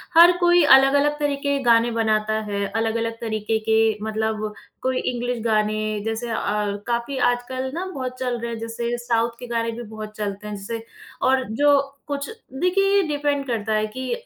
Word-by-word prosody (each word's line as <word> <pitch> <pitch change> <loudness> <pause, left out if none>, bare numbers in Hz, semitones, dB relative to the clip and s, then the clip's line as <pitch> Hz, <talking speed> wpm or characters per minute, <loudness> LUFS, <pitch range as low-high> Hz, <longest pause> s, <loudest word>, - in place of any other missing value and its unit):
हर 340 +2 +9
कोई 350 -1 +5
अलग-अलग 285 +2 +3
तरीके 280 -1 0
के - - -2
गाने 235 0 +4
बनाता 215 -1 +1
है, 200 0 -1
अलग-अलग 225 +1 -2
तरीके 220 -1 -1
के 220 -1 +3
मतलब 220 -1 -2 0.3
कोई 260 0 0 0.2
इंग्लिश 245 0 -2
गाने 215 -1 +1 0.2
जैसे 225 +2 -3
अ, 225 - -1 0.5
काफ़ी 240 +3 -1 0.2
आजकल 255 +2 -4
ना 350 +4 -3
बहुत 255 -1 -5
चल 250 -2 -1
रहे 235 0 -4
हैं 230 - -5
जैसे 235 +1 -3
साउथ 230 0 +1
के 245 - -8
गाने 230 -1 -1
भी 240 +1 -7
बहुत 215 -1 -8
चलते 205 0 -4
हैं 210 - -4
जैसे 225 +3 -5 0.4
और 260 0 +3
जो 285 +4 +4 0.3
कुछ 285 -1 -3
देखिए, 390 - 0
ये 400 - +4
डिपेंड 290 -1 -1
करता 220 -2 -1
है 215 0 +1
कि 260 - -3
235 Hz, 175 wpm, -23 LUFS, 220-275 Hz, 0.5 s, हर